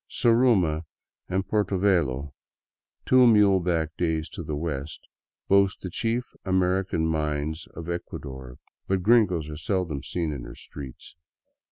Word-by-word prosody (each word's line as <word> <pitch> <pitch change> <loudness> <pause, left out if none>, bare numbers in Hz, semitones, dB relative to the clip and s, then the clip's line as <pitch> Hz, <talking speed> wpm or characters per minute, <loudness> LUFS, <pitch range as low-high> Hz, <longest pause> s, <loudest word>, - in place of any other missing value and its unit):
Zaruma 115 -10 +3 0.5
and 95 +1 -1
Portovelo, 90 -10 +1 0.7
two 130 -1 +6
muleback 90 -7 +3
days 80 -2 -1
to - - -7
the 75 - -4
west, 75 -1 -5 0.4
boast 100 0 +3
the 95 - -6
chief 115 +6 -1 0.2
Ameri 95 0 +1
can 80 -3 0
mines 75 0 -2
of 85 0 -7
Ecuador, 65 -7 -6 0.3
but 95 -2 0
gringos 100 -8 +3
are 75 -1 -7
seldom 90 - -2
seen 85 -4 -3
in 70 - -6
her - - -9
streets. 70 0 -10
85 Hz, 130 wpm, -26 LUFS, 75-95 Hz, 0.7 s, two